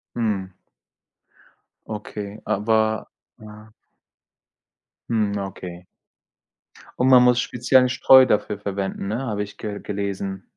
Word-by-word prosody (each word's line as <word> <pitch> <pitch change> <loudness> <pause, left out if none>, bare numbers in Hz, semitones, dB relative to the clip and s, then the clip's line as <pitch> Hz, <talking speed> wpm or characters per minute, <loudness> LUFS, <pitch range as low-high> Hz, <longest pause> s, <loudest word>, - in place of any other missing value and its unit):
Mhm. 100 -5 -2 1.3
Okay, 105 -1 -7
aber 110 0 0 0.3
ja. 105 0 -14 1.4
Mhm, 105 -3 0
okay. 90 -2 -7 1.1
Und 125 - +2
man 125 -1 +7
muss 125 0 +4
speziellen 125 +1 +2
Streu 130 +1 +6
dafür 105 -1 0
verwenden, 100 -1 -4
ne, 110 +4 -2
habe 110 -6 -3
ich 100 - -11
ge 105 -2 -5
gelesen. 100 -2 -4
105 Hz, 100 wpm, -22 LUFS, 100-115 Hz, 1.4 s, man